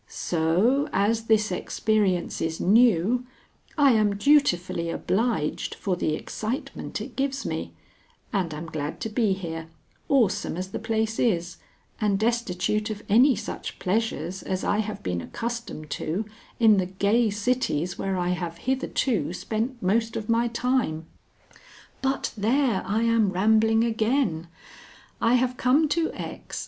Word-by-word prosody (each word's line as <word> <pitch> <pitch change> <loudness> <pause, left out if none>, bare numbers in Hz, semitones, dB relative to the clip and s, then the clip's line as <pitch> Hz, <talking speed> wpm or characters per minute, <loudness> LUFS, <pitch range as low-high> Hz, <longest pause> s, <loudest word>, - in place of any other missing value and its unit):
So, 180 - +1
as 220 +3 +1
this 215 -2 +2
experience 190 -1 0
is 160 0 -2
new, 230 +3 +3 0.5
I 285 -2 +6
am 215 -3 +3
dutifully 185 - +2
obliged 185 -4 -1
for 190 -3 -1
the 155 -3 0
excitement 245 +8 -5
it - - -8
gives 275 0 -2
me, - - -4 0.6
and 185 -5 0
am 155 +2 -6
glad 155 -2 -5
to 225 - -2
be 215 -2 +1
here, 165 -4 -5 0.4
awesome 235 -10 +2
as 185 +1 -5
the - - -4
place 220 0 -1
is, 175 -7 0 0.4
and 205 -2 +2
destitute 215 -2 0
of 210 -1 -5
any 250 +6 +6
such 215 - -6
pleasures 190 -3 -1
as 185 0 -3
I 205 - +1
have 215 -1 -3
been 90 -1 -2
accustomed 230 - -5
to 185 +8 -2 0.3
in 220 -3 +6
the 185 -1 +1
gay 205 +5 +2
cities 205 -6 -1
where 195 -1 -1
I 175 0 0
have 175 -2 -3
hitherto 255 - 0
spent 230 +5 -3
most 225 +4 +1
of 210 - -4
my 230 +1 +3
time. 235 -9 -1 1.0
But 270 0 -1
there! 230 0 +1
I 215 +3 +1
am 230 -3 +3
rambling 220 +4 +3
again. 220 - 0 0.7
I 235 +1 +4
have 250 0 +1
come 280 +5 +3
to 330 +1 +1
X. - - -7
215 Hz, 140 wpm, -25 LUFS, 180-235 Hz, 1.0 s, I